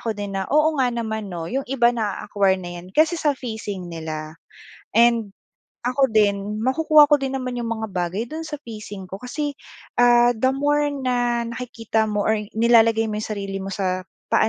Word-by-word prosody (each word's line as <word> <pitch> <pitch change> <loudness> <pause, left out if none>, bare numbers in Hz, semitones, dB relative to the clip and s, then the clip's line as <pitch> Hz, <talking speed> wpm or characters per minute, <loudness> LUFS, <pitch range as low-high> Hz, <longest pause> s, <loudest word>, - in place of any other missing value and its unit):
ko 225 -3 -3
din 205 -1 -5
na, - - -4
oo 305 +2 +3
nga 250 - +3
naman, 220 -3 -3
'no, 170 -3 -5
'yong 270 0 -2
iba 240 -3 +3
na-a-acquire 200 -3 0
na 180 -2 -7
'yan 180 - -14
kasi 320 +2 +4
sa 295 -3 +2
phasing 210 -7 -6
nila. 155 -1 -6 0.5
And 230 -3 +3 0.5
ako 260 +2 +2
din, 210 0 +1
makukuha 305 +3 +6
ko 290 - +5
din 270 0 -2
naman 250 -2 -3
'yong 230 - -3
mga 220 -1 -3
bagay 180 +4 -2
do'n 310 +7 -7
sa 315 -2 -5
phasing 210 -4 -8
ko 190 +2 -8
kasi, 290 +4 -3 0.5
ah, 240 0 +6
the 240 +3 +1
more 290 +2 +1
na 245 -4 0
nakikita 230 -2 -2
mo 210 -1 -1
or 220 -1 +2 0.2
nilalagay 225 -1 +5
mo 215 -1 -3
'yong 215 - -5
sarili 195 -1 -4
mo 195 - -5
sa 185 -1 -1 0.3
paa - - +4
230 Hz, 185 wpm, -22 LUFS, 200-255 Hz, 0.5 s, makukuha